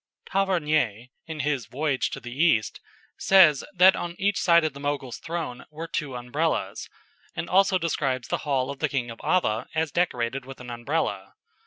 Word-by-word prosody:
Tavernier, 155 - 0 0.2
in 160 -2 -4
his 140 -4 -1
"Voyage 140 0 -1
to - - -6
the 120 +1 -9
East," 135 -7 +2 0.4
says 170 -8 +6
that 185 +1 +7
on 175 0 -4
each 200 +1 +1
side 170 -1 +5
of 155 -3 -1
the 140 - -10
Mogul's 140 -3 -3
throne 160 -7 -5
were 160 +2 -7
two 145 -5 -3
Umbrellas, 135 +7 -2 0.5
and - - -3
also 195 0 +4
describes 135 -7 -1
the - - 0
hall 135 -2 -1
of 140 - -9
the - - 0
King 125 -4 -2
of 115 - -11
Ava 115 -11 +1
as 160 -1 0
decorated 135 -7 -1
with 135 +1 -11
an 125 -1 -8
Umbrella. 120 -6 -2
145 Hz, 175 wpm, -26 LUFS, 125-170 Hz, 0.5 s, that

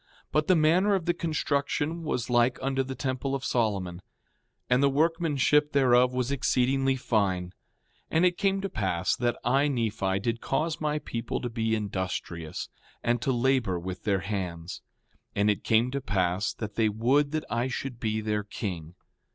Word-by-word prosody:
But 150 0 +1
the 185 - +5
manner 175 +6 +4
of 180 -4 -2
the 175 - +2
construction 155 0 -1
was 140 -7 -2
like 120 0 +3
unto 135 0 0
the 130 0 -4
temple 130 +1 -2
of 135 - -4
Solomon; 95 -7 -1 0.7
and 125 +1 +3
the 140 - +5
workmanship 150 -1 +2
thereof 125 -2 +4
was 125 +1 -1
exceedingly 135 0 +2
fine. 100 -8 0
5:17 - - -17 0.6
And 165 +3 +3
it 180 -1 +2
came 195 -1 +1
to 195 - -3
pass 95 -3 0
that 120 -1 0
I, 135 +4 +3
Nephi, 110 -7 0
did 115 +3 -2
cause 160 0 -1
my 150 -1 0
people 115 -5 -4
to 120 - -4
be 110 -1 0
industrious, 95 -5 -4 0.4
and 120 0 +1
to 135 - +1
labor 120 -7 +1
with 90 +1 -6
their 100 -3 +1
hands. 95 -3 -4 0.5
5:18 100 - +1
And 105 - +4
it 105 - -3
came 115 +3 +3
to 140 +1 -2
pass 95 -4 0
that 105 -3 -6
they 110 0 +2
would 130 +7 +2
that 155 - -1
I 115 +3 0
should 130 -1 -5
be 110 -1 -1
their 105 -1 -1
king. 90 -5 -5
120 Hz, 175 wpm, -28 LUFS, 105-140 Hz, 0.7 s, the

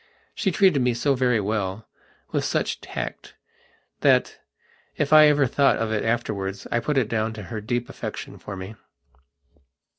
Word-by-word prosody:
She 195 - 0
treated 180 -5 +3
me 125 -1 +1
so 140 +4 +1
very 125 -2 +2
wellwith 105 0 -4
such - - -1
tactthat, - - -3 0.6
if 150 0 +1
I 155 0 +9
ever 145 -2 +4
thought 140 +3 +3
of 115 -1 -2
it 110 - 0
afterwards 100 -4 -2
I 120 - +2
put 150 +4 -1
it 125 -5 +2
down 110 0 -1
to 105 -1 -8
her 110 - -3
deep 120 +3 -2
affection - - -7
for 100 - -7
me. 95 +3 -7
115 Hz, 150 wpm, -24 LUFS, 105-140 Hz, 0.6 s, I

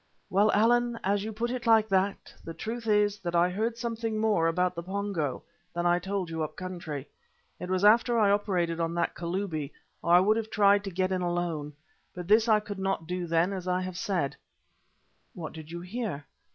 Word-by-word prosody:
"Well, 205 +3 +4
Allan, 240 +2 +3
as 200 +1 +1
you 220 - -4
put 230 +3 -2
it 250 -1 -4
like 220 -1 +5
that, 195 +1 0
the 165 - -7
truth 230 +1 -5
is 210 -1 +2
that 175 -1 -3
I 175 +1 +4
heard 225 +5 -1
something 230 -2 -3
more 215 -6 +2
about 180 +2 +1
the 170 - -5
Pongo 185 -6 -3 0.3
than 175 0 -1
I 175 0 +4
told 190 0 -3
you 160 0 -3
up 155 0 -3
country. 170 -6 -6 0.5
It 180 - -6
was 185 +1 +1
after 235 +3 +5
I 210 -3 +4
had - - +5
operated 180 -5 0
on 165 0 -1
that 170 0 0
Kalubi, 170 -4 -3 0.3
or 170 - -1
I - - +8
would 210 +4 +3
have 220 -1 -3
tried 200 -1 +4
to - - -3
get 185 +1 -1
in 185 -1 0
alone. 175 -4 -2 0.4
But 180 -1 -6
this 215 +3 +5
I 215 -1 +6
could 210 -2 -7
not 190 -4 -1
do 180 +1 -3
then 170 +4 +2
as 185 -2 -5
I 180 0 +1
have 185 -1 -5
said." 180 -6 -1
"And - - -18 1.1
what 155 - -6
did 155 -1 -10
you 170 +1 -6
hear?" 180 -6 -4
185 Hz, 215 wpm, -28 LUFS, 170-210 Hz, 1.1 s, I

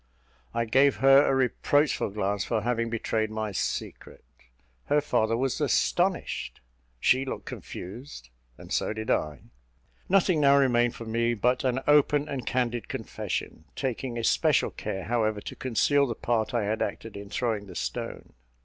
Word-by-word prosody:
I 115 0 -1
gave 135 +5 +4
her 135 +1 +6
a 135 - +2
reproachful 135 +2 +1
glance 100 0 -1
for 110 -2 -1
having 115 0 -1
betrayed 110 -1 -1
my 110 -1 -3
secret; 95 - -4 0.6
her 145 - +3
father 115 -5 +1
was 135 +4 -1
astonished 175 +6 0 0.4
she 130 - +3
looked 135 - -5
confused, 95 - -9 0.3
and - - -8
so - - 0
did 110 0 -3
I. 75 -4 -1 0.7
Nothing 185 -4 +3
now 140 0 +6
remained 120 -3 +3
for 115 - -8
me 115 +1 0
but 125 +4 +1
an 130 0 0
open 150 0 +4
and 135 -4 -5
candid 120 -3 -1
confession, 80 - -5
taking 130 -2 -3
especial 115 - +2
care, 95 -1 -5
however, 110 -2 0
to - - -7
conceal 140 +3 +2
the 115 - -3
part 115 -1 -1
I 120 -3 0
had 110 +2 -1
acted 115 - -4
in 100 0 -8
throwing 105 -1 -2
the 90 - -11
stone. - - -5
120 Hz, 155 wpm, -27 LUFS, 110-135 Hz, 0.7 s, her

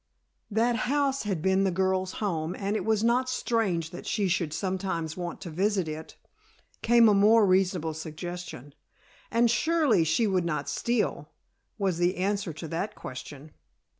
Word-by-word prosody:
That 230 +3 +2
house 275 -2 +1
had 175 -5 -2
been 190 +1 +3
the 195 - +2
girl's 185 +1 0
home 170 -4 -2
and 200 +1 -2
it - - -1
was 220 -1 +1
not 250 +2 +2
strange 200 -10 -1
that 175 - -9
she 205 -3 0
should 170 -3 0
sometimes 180 -2 -2
want 175 -1 -5
to 170 - -7
visit 190 +1 0
it, 155 +1 -7 0.7
came 235 0 +5
a 210 - +5
more 210 +2 +5
reasonable 185 -4 +1
suggestion. 160 -3 -7 0.6
And 235 +1 +3
surely 305 - +3
she 160 +9 +2
would 190 -4 +1
not 170 -3 -2
steal, 235 -1 -1 0.5
was 190 -5 -1
the 175 +2 +1
answer 195 0 -1
to 160 +2 -7
that 195 +7 -3
question. 140 +3 -9
190 Hz, 160 wpm, -27 LUFS, 170-220 Hz, 0.7 s, came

